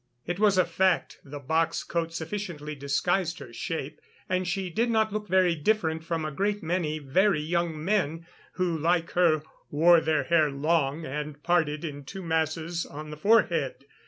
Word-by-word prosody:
It 175 +2 -3
was 205 -2 +4
a 185 - +5
fact 185 +1 +1
the 145 +1 -8
box 160 +4 0
coat 165 -1 -2
sufficiently 165 -3 -5
disguised 170 +5 0
her 120 - -10
shape, 145 +4 -5 0.3
and 185 0 0
she 185 0 -2
did 230 +7 +1
not 220 -2 +2
look 210 0 -3
very 185 -1 +3
different 160 -1 0
from 165 -1 -2
a 155 - -3
great 200 +7 -1
many 160 -2 -1
very 170 +6 +2
young 165 0 -2
men, 170 -5 0 0.3
who, 180 -2 0
like 165 +2 +1
her, 165 -4 +3 0.3
wore 165 +3 +5
their 155 -1 +1
hair 160 -3 +3
long 150 +1 0
and 150 +1 -5
parted 165 -3 +1
in 145 -2 -6
two 190 +8 -8
masses 160 +1 -1
on 150 +1 -8
the - - -6
forehead. 165 - +2
165 Hz, 170 wpm, -27 LUFS, 150-180 Hz, 0.3 s, a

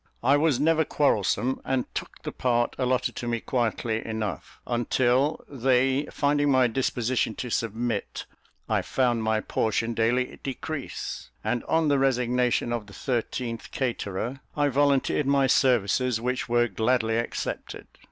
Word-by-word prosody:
I 135 +4 +5
was 145 -3 +2
never 160 +2 +3
quarrelsome, 130 -3 +1
and 130 -1 0
took - - -6
the - - -4
part 120 -1 0
allotted 130 -1 0
to 120 - -4
me 120 -1 0
quietly 115 -2 -1
enough, 110 -3 -5
until, 125 +4 +1
they 135 +1 +1
finding 145 0 +1
my 130 -2 +5
disposition 120 -1 0
to 125 - -5
submit, 115 -1 -2 0.4
I - - +1
found 120 -3 +1
my 110 -1 +1
portion 115 +2 -1
daily 120 +3 0
decrease, 140 +2 -5
and 120 -1 -1
on 160 -1 +2
the 140 -1 +3
resignation 125 -2 +1
of 115 -3 -3
the 100 - -13
thirteenth 120 -1 -3
caterer, 120 -1 -3 0.2
I 145 -1 +3
volunteered 140 +1 +2
my 140 -1 +4
services, 125 -2 +2
which 125 +1 -2
were 120 0 +3
gladly 115 -1 +1
accepted. 115 - -4
125 Hz, 140 wpm, -26 LUFS, 115-135 Hz, 0.4 s, I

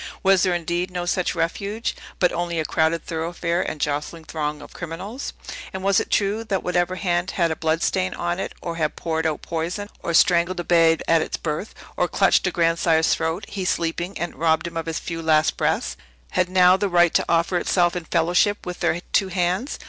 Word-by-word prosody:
Was 195 -1 +5
there, 185 -2 +2
indeed, 175 +2 -1
no 180 -1 -4
such 180 +1 0
refuge, 200 +6 -2 0.2
but 180 - +3
only 170 -1 -2
a 155 - -1
crowded 160 +2 +1
thoroughfare 170 +1 -2
and 155 - -4
jostling 150 +3 -2
throng 150 -2 -3
of 145 - -12
criminals? 185 - -6 0.4
And 190 0 -5
was 195 -1 +4
it - - -4
true, 205 +2 +1
that 195 -4 -1
whatever 180 0 0
hand 180 -1 0
had 170 -3 +2
a - - -1
blood 160 +1 0
stain 185 0 0
on 175 +1 -2
it, - - -4
or 170 -1 -4
had 155 -2 -1
poured 160 -1 -1
out 155 -2 -3
poison, 175 +5 -3
or 170 - -1
strangled 175 +1 +4
a - - -2
babe 165 -2 +4
at 165 -1 +4
its - - -3
birth, 155 +6 -4 0.2
or 180 - +2
clutched 195 +1 +3
a - - 0
grandsire's 165 -1 +2
throat, 165 +5 -2
he 200 -3 -4
sleeping, 175 +1 -1
and 175 +2 -3
robbed 160 0 +1
him 170 - -6
of 165 0 -3
his 165 0 -2
few 165 -1 -5
last 155 -1 +3
breaths, - - 0 0.4
had 180 -1 +1
now 185 0 +6
the 195 +1 -1
right 175 -1 +4
to - - +2
offer 170 +2 +2
itself 175 -1 +2
in 175 -2 -4
fellowship 175 +5 +1
with 180 0 -5
their 170 - 0
two 195 - +3
hands? 185 - -1
175 Hz, 210 wpm, -23 LUFS, 165-185 Hz, 0.4 s, now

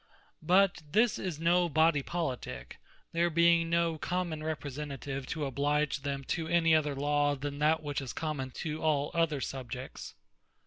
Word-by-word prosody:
But 185 +3 +3
this 220 +2 +3
is 175 -5 -4
no 175 +1 +3
Body 160 -1 +3
Politique, 130 - -4 0.3
there 170 +1 +2
being 170 0 +4
no 170 -1 +1
Common 175 -3 -2
Representative 140 -3 -5
to 155 -3 -2
oblige 145 +2 0
them 140 0 -3
to 160 +4 -2
any 165 -1 +3
other 150 -2 +2
Law, 145 +1 +1
than 145 +1 -5
that 155 +1 +2
which 145 -1 -2
is 130 -3 -5
common 150 -4 -3 0.2
to 155 0 -3
all 150 -2 +1
other 165 -4 +1
subjects. 130 -1 -6
155 Hz, 150 wpm, -31 LUFS, 140-165 Hz, 0.3 s, being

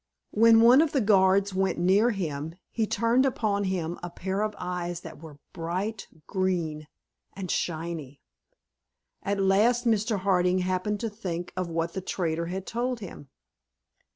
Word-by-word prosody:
When 225 +1 +6
one 245 +5 +7
of 320 -2 0
the 280 - +3
guards 195 -2 +3
went 190 0 0
near 190 +7 +4
him 160 -6 -3 0.2
he 225 -2 0
turned 235 +4 +2
upon 215 -6 0
him 175 -3 -2
a 175 - -5
pair 190 +3 -3
of 215 -1 -1
eyes 175 -1 -4
that 160 -3 -10
were 155 -3 -11 0.2
bright 185 +5 -3 0.2
green 170 -6 -2 0.5
and 185 -2 -4
shiny. 160 -4 -3 1.0
At 200 0 -1
last 215 +6 +3
Mr. 215 -2 +1
Harding 185 -1 +2
happened 185 +3 -1
to 230 - -1
think 180 -5 -5
what 170 -2 -2
the 190 - -3
trader 170 -3 -2
had 190 +2 -4
told 245 +1 -2
him. 170 -8 -10
190 Hz, 150 wpm, -27 LUFS, 170-215 Hz, 1.0 s, one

